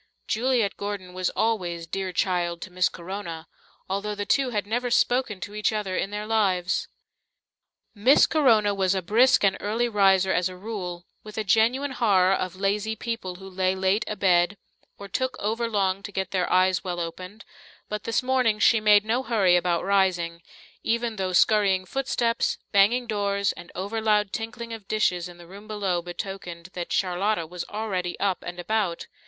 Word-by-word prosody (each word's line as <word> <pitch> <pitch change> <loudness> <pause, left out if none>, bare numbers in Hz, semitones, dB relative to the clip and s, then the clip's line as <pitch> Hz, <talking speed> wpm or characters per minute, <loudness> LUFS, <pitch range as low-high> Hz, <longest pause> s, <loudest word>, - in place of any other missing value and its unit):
Juliet 235 -3 +1
Gordon 200 -3 -5
was 185 0 -1
always 180 -7 -1
"dear 190 +2 -3
child" 175 -1 0
to 185 - -10
Miss 180 0 +2
Corona, 170 -2 -7 0.4
although 200 +2 -2
the 205 0 -3
two 270 +2 +2
had 210 -4 -2
never 245 +4 -1
spoken 245 -4 +1
to 205 - -6
each 210 0 0
other 210 -4 -2
in 195 - -1
their 210 +1 -4
lives. 190 -5 +1 1.1
Miss 235 +7 +5
Corona 225 -9 +3
was 195 -1 +1
a 190 - -2
brisk 230 +8 +4
and 195 -1 +3
early 225 +4 0
riser 195 -3 +3
as 180 +1 +1
a 185 - -9
rule, 180 -4 -6 0.2
with 215 0 -11
a 220 - 0
genuine 235 +7 +2
horror 195 -7 +3
of 185 -1 -2
lazy 205 +3 -1
people 230 -6 -4
who 190 +1 -11
lay 185 0 0
late 190 +3 +1
abed 190 -2 +2 0.4
or 200 - -9
took 260 +7 -2
over 225 +3 -1
long 195 -3 0
to 205 - -8
get 190 -1 -3
their 185 -2 0
eyes 185 0 +3
well 180 -2 -3
opened, 180 +5 -7 0.4
but 210 0 -4
this 230 - 0
morning 250 -4 +2
she 225 +1 +4
made 210 -1 +5
no 235 +4 +1
hurry 205 -8 +3
about 175 -1 +1
rising, 180 -4 +1 0.4
even 230 -1 -1
though 190 -1 -1
scurrying 195 0 +3
footsteps, 235 0 0
banging 220 +5 +4
doors, 200 -3 0
and 175 - -11
over 205 +5 -3
loud 210 -2 +2
tinkling 230 +1 -5
of 215 -3 -9
dishes 180 -5 0
in 175 - -13
the 175 - -13
room 200 +4 -12
below 195 -5 -1
betokened 175 -1 -7
that 175 -1 -5
Charlotta 185 0 0
was 175 +2 -6
already 195 -5 -3
up 195 -2 0
and 175 0 -7
about. 190 -2 -1
200 Hz, 175 wpm, -25 LUFS, 185-220 Hz, 1.1 s, Miss